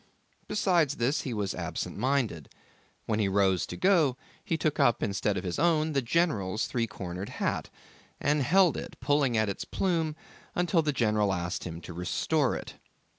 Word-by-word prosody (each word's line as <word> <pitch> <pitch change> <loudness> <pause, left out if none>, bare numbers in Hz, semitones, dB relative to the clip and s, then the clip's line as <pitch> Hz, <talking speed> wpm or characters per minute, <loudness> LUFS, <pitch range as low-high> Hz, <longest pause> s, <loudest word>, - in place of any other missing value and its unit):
Besides 170 -8 +2
this 125 +6 +1
he 130 - -4
was 105 -4 -2
absent - - -4
minded. 125 - -1 0.6
When 110 -1 0
he 105 - +2
rose 95 -2 +2
to - - -6
go, 165 -9 +3 0.3
he 165 - -1
took 155 -1 -1
up 120 -5 +3
instead 100 0 0
of - - -3
his 90 +4 -3
own, 160 -1 +2
the 135 - +2
general's 115 - +1
three 115 -2 -1
cornered 95 -2 -6
hat, - - -2 0.5
and 145 +1 +2
held 175 +5 +4
it, - - -7
pulling 140 -5 +2
at 110 - +3
the 100 - -4
plume, 165 -5 0 0.5
till 170 -1 +3
the 155 -1 0
general 105 -6 +1
asked 90 0 -3
him 85 -1 -6
to 85 - -8
restore 130 - 0
it. - - -7
125 Hz, 175 wpm, -29 LUFS, 100-155 Hz, 0.6 s, held